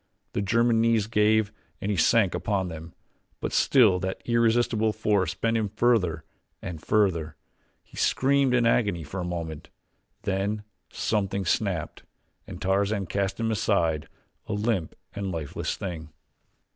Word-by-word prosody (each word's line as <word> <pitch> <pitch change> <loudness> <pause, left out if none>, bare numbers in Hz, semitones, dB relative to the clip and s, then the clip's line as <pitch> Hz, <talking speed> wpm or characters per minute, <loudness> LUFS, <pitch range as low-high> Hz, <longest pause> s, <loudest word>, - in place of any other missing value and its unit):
The - - 0
German's 115 +3 +2
knees 115 -2 +3
gave 110 -1 +2 0.3
and 100 - -2
he - - 0
sank 95 +3 +3
upon 95 -3 -1
them, 80 0 -9 0.4
but - - -4
still 110 -9 +4
that 95 +1 -3
irresistible 115 -2 +2
force 100 -5 0
bent 115 +3 0
him 110 -2 -1
further 95 -8 +1 0.4
and 85 -5 -7
further. 85 -8 +1 0.5
He - - -17
screamed 135 -1 +2
in 120 -1 +3
agony 100 -7 +2
for 90 +7 -6
a - - -2
moment 85 -3 -5 0.5
then 100 +2 -1 0.3
something 100 -2 -1
snapped 90 -4 -1 0.5
and - - -8
Tarzan 100 +1 0
cast 100 +3 -2
him 115 0 0
aside, 90 -8 0 0.4
a 110 - -3
limp 105 -5 -1 0.2
and 100 -2 -3
lifeless 80 -5 -3
thing. 85 -5 -6
100 Hz, 140 wpm, -26 LUFS, 90-110 Hz, 0.5 s, still